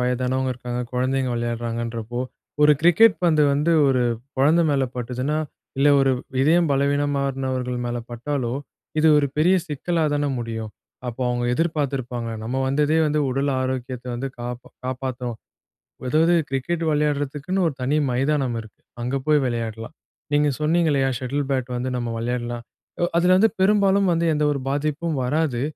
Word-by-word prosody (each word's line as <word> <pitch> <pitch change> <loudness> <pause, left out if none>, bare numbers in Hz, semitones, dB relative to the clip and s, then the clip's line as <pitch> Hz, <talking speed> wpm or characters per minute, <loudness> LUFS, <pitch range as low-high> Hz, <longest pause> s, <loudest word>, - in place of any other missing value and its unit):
வயதானவங்க 130 +1 0
இருக்காங்க, 125 0 -4
கொழந்தைங்க 130 +1 0
விளையாடுறாங்கன்றப்போ, 115 0 -3 0.4
ஒரு 150 0 +7
கிரிக்கெட் 175 +6 +6
பந்து 155 -3 +4
வந்து, 150 +4 +2 0.2
ஒரு 130 -2 +2 0.3
கொழந்த 150 +6 +4
மேல 135 -2 +2
பட்டுச்சுன்னா, 125 +5 -2 0.4
இல்ல 145 - +5
ஒரு 135 0 +3 0.3
இதயம் 165 +3 +4
பலவீனமானவர்கள் 135 -3 0
மேல 120 0 -2
பட்டாலோ, 120 0 -2 0.5
இது 160 +1 +5
ஒரு 145 - +2
பெரிய 175 +5 +4
சிக்கலா 165 +2 -1
தானே 145 0 0
முடியும்? 115 -2 -4 0.4
அப்போ 120 +2 -4
அவுங்க 120 0 -1
எதிர்பாத்திருப்பாங்க, 135 -7 -2
நம்ம 125 +4 -2
வந்ததே 150 +3 +2
வந்து, 150 0 +1
உடல் 135 +2 0
ஆரோக்கியத்தை 130 -1 -4
வந்து 135 +3 -3
காப்ப 120 0 -5 0.2
காப்பாத்தணும் 125 -2 -4 0.7
அதாவது 160 +5 +4
கிரிக்கெட் 160 +6 -2
விளையாடுறதுக்குன்னு, 150 +4 0
ஒரு 150 - -5
தனி 135 +4 +1
மைதானம் 135 -1 0
இருக்கு. 110 - -17 0.2
அங்க 125 +3 -1
போய் 150 -1 +4
விளையாடலாம். 115 +1 -4 0.4
நீங்க 145 0 +3
சொன்னீங்க 165 +2 +2
இல்லையா, 135 -2 +2
"ஷட்டில் 135 +3 -2
பேட் 130 -2 0
வந்து 125 +1 -2
நம்ம 120 -1 -2
விளையாடலாம்". 120 0 -3 0.4
ஒ - - +5
அதுல 180 +2 +4
வந்து 220 +4 +4
பெரும்பாலும் 195 -1 +4
வந்து, 170 0 +1
எந்த 150 0 +1
ஒரு 140 - -3
பாதிப்பும் 150 +2 -1
வராது. 145 -2 0
135 Hz, 145 wpm, -23 LUFS, 125-150 Hz, 0.7 s, ஒரு